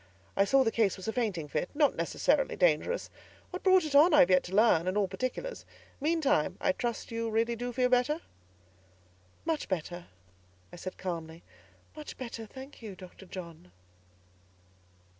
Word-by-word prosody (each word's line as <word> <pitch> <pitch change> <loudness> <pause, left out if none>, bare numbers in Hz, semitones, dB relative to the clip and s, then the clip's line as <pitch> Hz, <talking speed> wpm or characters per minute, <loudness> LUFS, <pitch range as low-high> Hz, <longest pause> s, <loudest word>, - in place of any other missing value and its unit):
I 195 - +4
saw 270 +5 +4
the 225 - +1
case 220 -5 +1
was 190 - -8
a 220 - -1
fainting 200 -11 -1
fit, 150 +4 -2
not 295 -2 +3
necessarily - - +1
dangerous. - - +1 0.4
What 365 - -5
brought 375 -2 +5
it 300 - -4
on, 300 +3 +7
I - - +8
have 180 - +5
yet 185 - +6
to 185 - -5
learn, 200 -6 +4
and 185 +2 0
all 200 -2 +2
particulars; 255 - -4 0.4
meantime, 300 -1 +1
I - - +2
trust 240 -4 -4
you 230 0 -2
really 230 +2 +1
do 245 +2 -4
feel 250 +1 +2
better?" 255 +6 +2 1.2
"Much 320 -2 -1
better," 175 -1 -4 0.7
I - - -8
said 185 +2 -7
calmly. 165 -2 -5 0.5
"Much 305 -1 -9
better, 235 -3 -6
I - - -16
thank 265 +4 -11
you, 210 -4 -7
Dr. 185 +1 -13
John." 170 - -9
230 Hz, 170 wpm, -30 LUFS, 185-285 Hz, 1.2 s, I